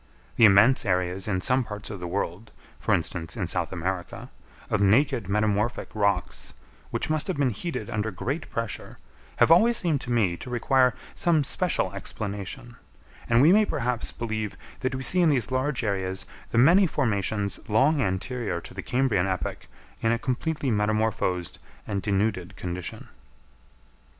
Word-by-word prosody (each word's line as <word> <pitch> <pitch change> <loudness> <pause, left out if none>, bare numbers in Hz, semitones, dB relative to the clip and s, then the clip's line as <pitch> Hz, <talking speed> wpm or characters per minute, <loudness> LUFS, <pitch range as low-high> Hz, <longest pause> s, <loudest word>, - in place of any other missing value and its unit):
The 115 - +7
immense 110 +6 +6
areas 90 0 0
in 95 -3 0
some 130 +3 +2
parts 105 -2 -7
of 100 - -6
the 90 - -5
world, 95 +3 -3 0.3
for - - -2
instance 80 0 -3
in - - -1
South - - -1
America, 90 +1 -4 0.4
of 105 - 0
naked 115 +1 +3
metamorphic 105 +2 0
rocks, 100 -1 -1 0.4
which - - -2
must 155 -1 0
have 185 - -2
been 140 -3 +2
heated 115 - -4
under 110 -2 -2
great 135 - -4
pressure, 115 -1 -5 0.4
have - - +4
always 230 +7 +6
seemed 160 -6 0
to 125 - -5
me 100 -8 +2
to 125 - -9
require 125 +1 +2 0.2
some 165 -4 +2
special 145 - 0
explanation; 100 +3 -6 0.5
and 120 +2 +5
we 160 - +7
may 215 +1 +6
perhaps 125 - -2
believe 110 -3 -4 0.2
that 130 0 -2
we 130 - -4
see 180 +8 +4
in 170 - +5
these 130 -5 +1
large 130 0 -1
areas 95 -3 -2 0.2
the - - -2
many 175 +10 +6
formations 100 - -1
long 140 +8 +3
anterior 100 -1 -2
to - - -11
the - - -5
Cambrian 125 -8 +1
epoch 95 -1 -3 0.3
in 115 - +2
a 115 - +2
completely 140 +2 -2
metamorphosed 105 -5 0 0.3
and 100 -2 -2
denuded 100 -2 -1
condition. 90 0 -6
110 Hz, 160 wpm, -26 LUFS, 100-130 Hz, 0.5 s, The